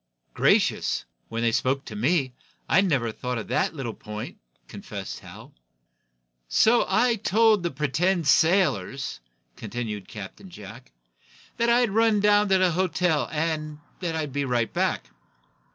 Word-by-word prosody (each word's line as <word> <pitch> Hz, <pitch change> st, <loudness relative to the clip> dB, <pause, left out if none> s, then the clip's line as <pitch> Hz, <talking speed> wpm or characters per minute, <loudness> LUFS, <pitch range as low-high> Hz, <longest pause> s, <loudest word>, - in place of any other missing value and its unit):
"Gracious! -, -, +2 dB, 0.2 s
When 115 Hz, +1 st, -3 dB
they 115 Hz, -, +3 dB
spoke 130 Hz, +4 st, 0 dB
to 105 Hz, -, -8 dB
me, 130 Hz, +3 st, +1 dB, 0.3 s
I -, -, +4 dB
never 140 Hz, -, 0 dB
thought 125 Hz, +2 st, -4 dB
of 115 Hz, -, -6 dB
that -, -, 0 dB
little 125 Hz, -6 st, -4 dB
point," 105 Hz, 0 st, -8 dB, 0.3 s
confessed -, -, -7 dB
Hal. -, -, -13 dB, 1.0 s
"So 230 Hz, -, +4 dB
I 230 Hz, +4 st, +3 dB
told 220 Hz, 0 st, +3 dB
the 170 Hz, -, -1 dB
pretended 160 Hz, +5 st, 0 dB
sailors," 140 Hz, -, +2 dB, 0.4 s
continued 110 Hz, -5 st, -5 dB
Captain 110 Hz, -, -10 dB
Jack, 100 Hz, -, -12 dB, 0.7 s
"that 235 Hz, 0 st, +1 dB
I'd 240 Hz, -2 st, +3 dB
run 220 Hz, 0 st, +3 dB
down 205 Hz, 0 st, +4 dB
to 190 Hz, -, +5 dB
the 185 Hz, -1 st, +3 dB
hotel, 180 Hz, -3 st, 0 dB
and 155 Hz, -1 st, -2 dB, 0.2 s
that 170 Hz, -3 st, -3 dB
I'd 150 Hz, -4 st, -3 dB
be 140 Hz, 0 st, -1 dB
right 120 Hz, -3 st, -1 dB
back." -, -, -1 dB
155 Hz, 140 wpm, -25 LUFS, 120-190 Hz, 1.0 s, to